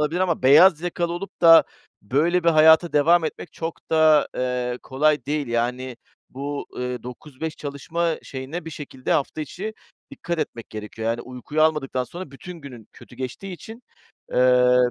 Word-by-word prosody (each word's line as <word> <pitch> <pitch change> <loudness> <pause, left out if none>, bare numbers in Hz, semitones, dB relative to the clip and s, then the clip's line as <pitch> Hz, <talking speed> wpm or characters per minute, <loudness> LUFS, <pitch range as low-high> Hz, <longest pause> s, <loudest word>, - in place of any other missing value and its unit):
olabilir 155 +4 0
ama 175 -6 0
beyaz 155 +5 +7
yakalı 170 0 -2
olup 195 +3 -7
da 165 -1 +8 0.4
böyle 165 - +1
bir - - +4
hayata 160 +1 +5
devam 160 +3 +4
etmek 155 - -6
çok 165 0 -7
da, 155 -2 +4
eee, 125 -1 -2
kolay 145 0 +1
değil. 145 0 -1
Yani 120 +2 -2 0.3
bu, 140 +2 -5
ııı, 125 0 -4
9-5 145 +5 -7
çalışma 160 +4 -2
şeyine 140 +6 -7
bir 160 - -7
şekilde 140 -4 -5
hafta 150 +2 -1
içi 195 +9 -6 0.4
dikkat 170 -1 -5
etmek 115 -6 -5
gerekiyor. 110 +1 -5
Yani 115 +1 -1
uykuyu 130 +5 -3
almadıktan 140 -5 +1
sonra 175 +3 -9
bütün 170 +7 -10
günün 125 -6 -12
kötü 125 - -16
geçtiği 130 +10 -6
için, 225 +7 -11 0.5
ııı, 125 0 +4
145 Hz, 155 wpm, -23 LUFS, 125-165 Hz, 0.5 s, da